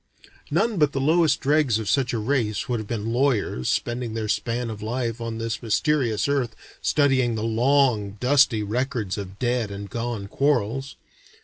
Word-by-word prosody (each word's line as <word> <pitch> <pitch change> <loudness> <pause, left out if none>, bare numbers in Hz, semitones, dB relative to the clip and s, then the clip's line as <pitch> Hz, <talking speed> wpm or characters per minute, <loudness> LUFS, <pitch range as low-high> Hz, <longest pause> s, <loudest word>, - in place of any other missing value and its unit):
None 225 -3 +1
but 150 -2 +3
the 135 - -1
lowest 160 +3 +3
dregs 145 -5 +3
of 110 -2 -5
such 130 +2 +1
a 120 - -1
race 115 +1 -1
would 120 -3 -1
have 110 - -6
been 115 0 -3
lawyers 120 - +1
spending 120 -1 -2
their 110 -1 -2
span 115 +2 -1
of 105 -1 -8
life 115 +1 -3
on 115 -1 -4
this 115 0 -3
mysterious 120 -1 +1
earth 135 -5 0 0.3
studying 130 -5 +2
the 110 - -3
long 115 -3 +2
dusty 125 -4 +3
records 115 -2 -2
of 95 -1 -8
dead 120 -2 0
and 100 0 -7
gone 115 -4 -3
quarrels. 135 +1 0
120 Hz, 170 wpm, -24 LUFS, 110-135 Hz, 0.3 s, but